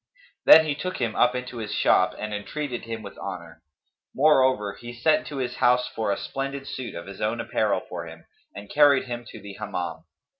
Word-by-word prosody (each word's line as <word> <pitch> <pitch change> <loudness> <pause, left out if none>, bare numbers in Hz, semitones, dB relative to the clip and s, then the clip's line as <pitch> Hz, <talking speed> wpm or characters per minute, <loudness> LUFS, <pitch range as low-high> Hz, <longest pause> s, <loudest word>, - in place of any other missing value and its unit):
Then 160 - +10
he 150 - 0
took 185 +5 -4
him 115 -3 -2
up 125 +1 +3
into 125 -1 -5
his 110 -2 -4
shop 90 0 +3
and 105 0 -5
entreated 120 +4 -4
him 115 -1 -6
with 100 - -10
honour; 85 -4 -7 0.5
moreover, 130 -8 +3
he 120 +4 -9
sent 140 +7 +2
to 145 - -6
his 125 -2 -3
house 125 0 +3
for 110 -2 -2
a 100 - 0
splendid 135 0 -4
suit 130 -3 -6
of 85 - -7
his 95 0 -10
own 110 +2 0
apparel - - 0
for - - -6
him - - -12 0.3
and 100 0 -9
carried 145 +1 +5
him 120 -1 -6
to 110 - -11
the 100 -1 -9
Hammam. 85 -5 -4
120 Hz, 200 wpm, -25 LUFS, 100-130 Hz, 0.5 s, Then